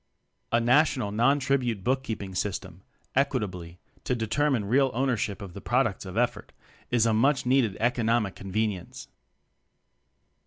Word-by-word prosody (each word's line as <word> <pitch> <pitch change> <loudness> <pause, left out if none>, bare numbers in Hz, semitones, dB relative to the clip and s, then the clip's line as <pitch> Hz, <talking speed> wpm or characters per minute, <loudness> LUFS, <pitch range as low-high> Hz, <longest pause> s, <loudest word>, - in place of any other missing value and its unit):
A 115 - +4
national 125 -2 +2
(non 120 +7 +3
tribute) 130 -7 0
bookkeep 125 -3 -1
ing 95 -1 -8
system 95 -1 -4 0.3
equitably 95 -11 -1 0.3
to 125 - 0
determine 120 +1 0
real 135 +6 +3
ownership 120 -6 -1
of 95 -3 -9
the - - -9
products - - 0
of - - -7
effort, - - -1 0.4
is 120 -2 +3
a 115 - +2
much 130 +4 +2
needed 125 -6 +2
economic 115 -3 +1
conven 105 +3 -1
ience. - - -12
115 Hz, 140 wpm, -27 LUFS, 100-130 Hz, 0.4 s, A